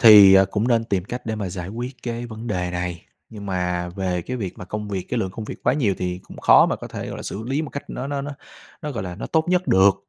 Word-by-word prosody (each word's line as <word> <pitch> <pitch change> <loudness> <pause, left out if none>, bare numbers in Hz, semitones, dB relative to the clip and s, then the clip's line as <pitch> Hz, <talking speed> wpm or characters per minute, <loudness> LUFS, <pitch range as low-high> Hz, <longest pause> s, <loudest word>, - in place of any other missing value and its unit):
thì, 105 -4 +10
ờ, 95 - +8
cũng 110 +5 0
nên 115 -2 +3
tìm 95 -5 -1
cách 120 +2 -6
để 110 - -1
mà 100 -3 -3
giải 90 0 -5
quyết 120 +4 -5
cái 120 0 -3
vấn 110 +1 -8
đề 90 -4 -1
này. 90 -1 -3 0.3
Nhưng 105 -2 -9
mà 90 -2 -1
về 90 -2 -1
cái 125 +6 -4
việc 100 -6 -5
mà - - -6
công 105 +2 -5
việc, 95 -3 -3
cái 125 - 0
lượng 95 -4 -1
công 110 +3 -6
việc - - -8
quá - - +3
nhiều 120 -9 +2
thì 90 0 -2
cũng - - -13
khó - - +7
mà - - 0
có - - -8
thể, - - -5
gọi - - -5
là, - - -6
xử 105 - -5
lý 135 +6 -1
một 150 - -5
cách 140 - -7
nó 130 - -4
nó 140 -1 -2
nó 145 - -4 0.5
nó, 150 - -3
gọi 110 -4 -3
là, 90 -2 -5
nó - - -5
tốt 160 -1 +2
nhất 180 0 +2
được. 95 +1 +6
105 Hz, 295 wpm, -23 LUFS, 95-120 Hz, 0.5 s, thì